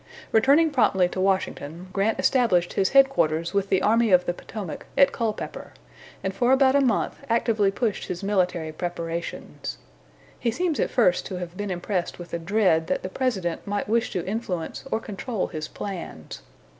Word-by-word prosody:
Returning 280 +8 +5
promptly 190 -9 +3
to 185 - -3
Washington, 185 -3 -1
Grant 205 +3 +1
established 200 -10 +2
his 190 -1 +2
headquarters 170 - +3
with 200 -1 0
the 190 - +2
Army 230 +1 +3
of 180 -1 +5
the 175 - 0
Potomac, 195 -1 -7
at 275 - +6
Culpepper, 225 -3 -4 0.5
and 190 - -1
for 240 +6 +2
about 265 0 +5
a 280 - +5
month 245 -5 +1
actively 225 -3 +2
pushed 210 +1 -2
his 180 +1 -5
military 180 -5 0
preparations. 170 0 -5 0.6
He 240 - 0
seems 325 +5 -1
at - - +1
first 180 -8 +2
to 185 - -5
have 175 -1 -6
been 205 +1 -4
impressed 180 0 -2
with 175 -1 -10
a 170 - -1
dread 170 -3 +2
that - - -1
the 185 - -3
President 190 -9 -2
might 205 0 -2
wish 230 +2 +1
to 180 - -2
influence 190 -5 -3
or - - +1
control 215 0 -3
his 155 0 -5
plans. 175 - -7
195 Hz, 170 wpm, -25 LUFS, 175-230 Hz, 0.6 s, at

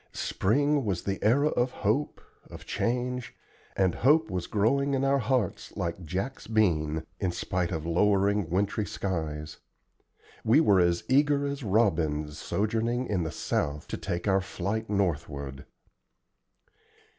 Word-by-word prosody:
Spring 145 +8 +1
was 95 -5 -2
the 100 -1 -3
era 140 +8 +4
of 125 -2 +1
hope, 125 +5 -1 0.3
of - - -10
change, 125 0 -2 0.4
and 95 -3 +2
hope 150 +1 +3
was 90 -1 -3
growing 140 +7 +1
in 135 - 0
our 135 0 +3
hearts 125 -5 -1
like 85 +1 -3
"Jack's 95 - -4
bean," 80 -8 +1 0.2
in 95 -3 0
spite 90 0 -2
of 80 -3 -3
lowering 100 +2 +2
wintry 100 +3 0
skies. 80 -7 -4 0.9
We 115 +7 +5
were 100 -12 +5
as 85 -1 +2
eager 145 +2 +3
as 140 0 -3
robins, 80 - +1
sojourning 115 +4 -1
in 100 -6 -1
the 80 - -2
south, 75 0 -2
to - - -3
take 85 +3 -3
our 95 -1 +3
flight 100 +4 -3
northward. 75 -8 -2
100 Hz, 135 wpm, -28 LUFS, 85-125 Hz, 0.9 s, We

